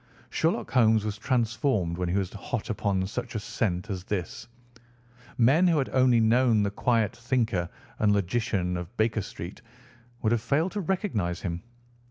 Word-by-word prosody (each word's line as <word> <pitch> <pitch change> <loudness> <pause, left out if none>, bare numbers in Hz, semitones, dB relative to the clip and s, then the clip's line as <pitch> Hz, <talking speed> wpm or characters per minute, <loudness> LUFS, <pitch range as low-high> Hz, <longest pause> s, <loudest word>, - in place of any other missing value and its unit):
Sherlock 170 +8 0
Holmes 110 -4 +4
was 105 -1 -3
transformed 115 -6 0
when 90 -1 -1
he 90 - +1
was 95 -1 -2
hot 110 +3 -4
upon 100 -3 0
such 120 +4 -5
a - - 0
scent 100 -2 -2
as 90 -2 -4
this. 95 -6 -4 0.9
Men 140 +10 +5
who 165 -3 +3
had 135 - 0
only 130 -2 +4
known 115 -1 +4
the 100 - 0
quiet 115 +1 +1
thinker 115 -8 0 0.3
and 105 -1 +3
logician 100 -2 0
of 90 +7 -8
Baker 110 0 +1
Street 90 +2 -8 0.6
would 110 - +2
have 120 -2 +2
failed 145 +10 +1
to 210 - -3
recognise 155 - -1
him. 85 -2 -3
110 Hz, 165 wpm, -27 LUFS, 95-125 Hz, 0.9 s, Men